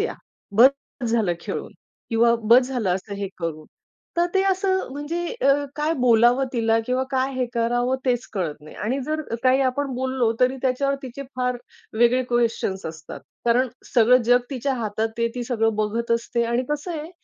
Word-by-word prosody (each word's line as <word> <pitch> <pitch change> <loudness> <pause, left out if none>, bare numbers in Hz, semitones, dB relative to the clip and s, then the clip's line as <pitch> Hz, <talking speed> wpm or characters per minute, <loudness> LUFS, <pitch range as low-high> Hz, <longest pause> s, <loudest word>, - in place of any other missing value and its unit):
या, - - -1 0.4
बस 260 +3 +3
झालं 220 -6 +2
खेळून - - -5 0.4
किंवा 235 +1 +4 0.2
बस 250 +1 +6
झालं 240 -8 -1
असं 200 +2 -6
हे 200 -1 -4
करून. 155 -2 -4 0.5
तर 345 0 +3
ते 385 - +4
असं, 380 0 0
म्हणजे 310 +5 -3
अ, 275 - +5 0.2
काय 305 +2 0
बोलावं 245 +1 +4
तिला 225 -2 +2
किंवा 255 +1 +1
काय 265 0 0
हे 255 -1 0
करावं? 245 +2 +1
तेच 245 -2 +1
कळत 180 -8 -2
नाही 155 - -13
आणि 250 +6 -2
जर 310 +1 -1 0.2
काही 260 +1 +4
आपण 265 0 -1
बोललो, 260 -2 0
तरी 255 +1 +3
त्याच्यावर 275 +2 +1
तिचे 260 +1 -7
फार 250 -1 0 0.4
वेगळे 240 +2 +4
क्वेश्चन्स 230 -5 0
असतात. 160 0 -8 0.2
कारण 245 +2 +3 0.3
सगळं 245 +1 +5
जग 245 +2 +4
तिच्या 265 0 -1
हातात, 220 -3 -4
आता 225 - -3
ते 230 0 +2
ती 245 - -3
सगळं 225 -3 0
बघत 220 +2 -1
असते 235 0 0
आणि 235 +2 0
कसं 295 +4 -2
आहे 310 +3 -8
245 Hz, 180 wpm, -23 LUFS, 225-265 Hz, 0.5 s, बस